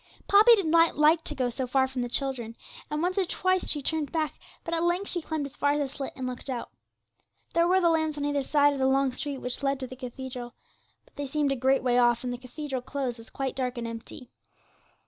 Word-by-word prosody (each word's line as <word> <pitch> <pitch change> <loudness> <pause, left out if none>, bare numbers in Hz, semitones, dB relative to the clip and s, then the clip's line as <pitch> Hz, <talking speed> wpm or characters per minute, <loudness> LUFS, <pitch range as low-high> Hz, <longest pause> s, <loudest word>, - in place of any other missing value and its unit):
Poppy 430 +4 +8
did 395 -5 -1
not 330 0 +4
like 310 +2 +5
to 295 - -5
go 255 -3 0
so 255 +2 -3
far 265 +1 +2
from 260 -1 -4
the 245 - -1
other - - -14
children, 250 -5 -1 0.3
and 300 +2 -2
once 365 +2 +1
or - - +3
twice 370 +1 0
she 295 -2 0
turned 310 -1 -1
back, 315 -2 -1 0.3
but 335 - -4
at 330 - +1
length 350 +3 +1
she 350 - -1
climbed 310 -2 -3
as 280 - -9
far 285 0 +2
as 295 - 0
the 285 - 0
slit, 275 - -5
and 260 - -5
looked 255 +2 -6
out. 245 -3 -4 0.8
There 335 0 +3
were 370 +1 +4
the 350 - +3
lamps 315 -2 0
on 290 - -2
either 290 -1 +1
side 290 +1 +3
of 275 - -4
the 265 - +3
long 270 0 +3
street 280 +2 -4
which 250 0 -4
led 275 -1 0
to 260 - -4
the 255 - -9
cathedral, 250 -1 -7 0.5
but - - -28
they 285 -1 -3
seemed 290 0 0
a - - +1
great 265 +1 +2
way 245 -1 +3
off, 240 0 +3
and 250 -1 -2
the 245 - -6
cathedral 260 +1 -5
close 255 -2 -3
was 225 - -11
quite 270 -2 -3
dark 250 -1 -2
and 235 - -3
empty. 230 +2 -9
275 Hz, 255 wpm, -27 LUFS, 255-310 Hz, 0.8 s, Poppy